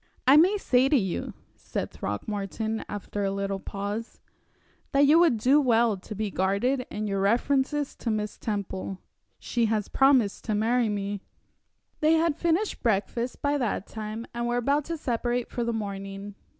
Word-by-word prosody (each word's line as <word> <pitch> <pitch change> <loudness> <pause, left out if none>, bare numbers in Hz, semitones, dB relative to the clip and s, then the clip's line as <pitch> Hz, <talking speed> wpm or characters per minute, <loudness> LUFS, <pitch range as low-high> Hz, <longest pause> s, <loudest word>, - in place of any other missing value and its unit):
"I 265 +2 +7
may 365 +7 +6
say 260 -8 +3
to 290 - +5
you," 190 -7 -2 0.2
said - - -4
Throckmorton, 210 - -3
after 205 0 -4
a 195 - +1
little 195 0 -2
pause, 205 +4 -5 0.7
"that 275 - +4
you 305 +4 +6
would 330 -9 +4
do 265 +7 +4
well 235 -4 +3
to 200 +3 -9
be 210 0 -2
guarded 205 +9 0
in 215 +1 -4
your 195 -2 -1
references 270 +7 +1
to 235 - -3
Miss 210 -1 -2
Temple. 195 -3 -3 0.4
She 235 -1 0
has 215 -2 -1
promised 265 -7 +3
to 215 - 0
marry 230 +2 +2
me." 200 -1 -3 0.8
They 310 +1 +4
had 325 -1 +2
finished 340 +7 0
breakfast 235 +2 -1
by 290 0 +1
that 220 -5 -1
time, 220 +1 -6
and 235 0 -2
were 240 0 0
about 280 +4 +1
to 335 0 -3
separate 245 -3 -1
for 240 - -2
the 235 - 0
morning. 200 -2 -5
225 Hz, 165 wpm, -27 LUFS, 205-265 Hz, 0.8 s, I